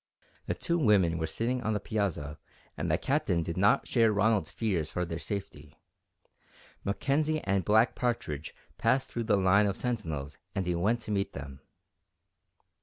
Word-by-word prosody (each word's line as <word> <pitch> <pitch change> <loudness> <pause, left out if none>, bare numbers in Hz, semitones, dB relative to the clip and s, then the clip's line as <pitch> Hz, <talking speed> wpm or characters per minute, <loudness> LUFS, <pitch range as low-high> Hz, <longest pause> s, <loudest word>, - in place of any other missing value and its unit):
The - - -1
two 170 -1 -1
women 95 - +3
were 80 - -1
sitting 120 +10 -1
on 110 -1 0
the 105 - 0
piazza 95 -9 -2 0.4
and 85 +4 -3
the 80 - +3
Captain 100 - 0
did 85 0 -4
not 100 +3 +3
share 115 -3 +3
Ronald's 105 -4 +2
fears 85 -4 -1
for 90 - -2
their 85 0 -5
safety. 85 -8 -6 1.1
Mackenzie 150 +9 0
and 95 -1 0
Black 110 +5 +4
Partridge 80 - -3 0.2
passed 130 0 +1
through 120 -1 -3
the 105 -2 +3
line 100 +2 +4
of 100 - -1
sentinels 80 - -3 0.2
and 95 - -1
he 90 - 0
went 105 +8 +1
to 110 - -6
meet 100 -1 -1
them. 70 -1 -8
100 Hz, 165 wpm, -30 LUFS, 85-115 Hz, 1.1 s, Black